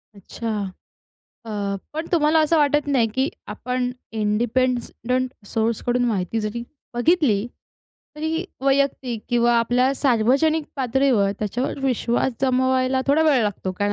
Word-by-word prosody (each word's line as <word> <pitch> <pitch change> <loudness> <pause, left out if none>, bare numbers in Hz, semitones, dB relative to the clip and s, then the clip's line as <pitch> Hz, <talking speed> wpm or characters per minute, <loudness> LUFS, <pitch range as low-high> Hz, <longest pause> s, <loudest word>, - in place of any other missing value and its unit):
अच्छा. 225 +4 -7 1.0
अ, - - -8 0.4
पण 320 +2 -3
तुम्हाला 315 -1 +4
असं 315 +1 +3
वाटत 295 0 +2
नाही, 250 -5 +3
की 265 +2 +1 0.2
आपण 250 +4 -2 0.2
इंडिपेंडंट 245 +3 0 0.2
सोर्सकडून 235 +3 0
माहिती 215 0 -1
जरी 215 +3 -3 0.3
बघितली, 240 - +2 0.7
तरी 320 +3 -2 0.2
वैयक्तिक 270 -4 0
किंवा 240 -1 +3
आपल्या 245 +3 +2
सार्वजनिक 275 +5 +2
पातळीवर, 255 -5 +2
त्याच्यावर 240 +7 -2
विश्वास 245 0 +1
जमवायला 260 0 +2
थोडा 290 +3 +4
वेळ 285 -7 +4
लागतो, 195 -2 -2
कारण 205 +2 -1
250 Hz, 115 wpm, -22 LUFS, 225-275 Hz, 1.0 s, तुम्हाला